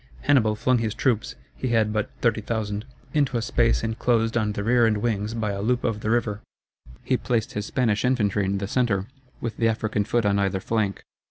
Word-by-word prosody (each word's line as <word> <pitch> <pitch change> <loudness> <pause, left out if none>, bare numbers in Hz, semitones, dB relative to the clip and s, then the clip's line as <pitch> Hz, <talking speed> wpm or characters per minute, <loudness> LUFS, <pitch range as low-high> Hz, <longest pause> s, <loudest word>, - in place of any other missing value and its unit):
Hannibal 110 -7 +3
flung 125 +3 +2
his 110 -2 -2
troops 115 -4 0 0.2
(he 130 - -3
had 110 -3 +2
but 105 -1 -1
30,000) 110 -2 -1 0.3
into 140 -5 +2
a - - -1
space 115 -1 +2
inclosed 115 0 +1
on 105 -3 +1
the 100 - -3
rear 120 +1 +4
and 105 -1 +1
wings 105 0 -1
by 110 -2 -1
a 100 0 -3
loop 125 +4 0
of 110 -2 -1
the 110 - -3
river. 110 -3 0 0.6
He 130 - +1
placed 115 -3 -1
his 105 0 -3
Spanish 115 -7 +1
infantry 105 -6 +1
in 100 +1 0
the 100 0 -3
centre, 105 -5 +1 0.4
with 115 -1 -4
the 115 - +2
African 110 -2 0
foot 115 +2 0
on 100 0 +2
either 95 -1 0
flank. 105 -1 -1
110 Hz, 200 wpm, -25 LUFS, 105-120 Hz, 0.6 s, rear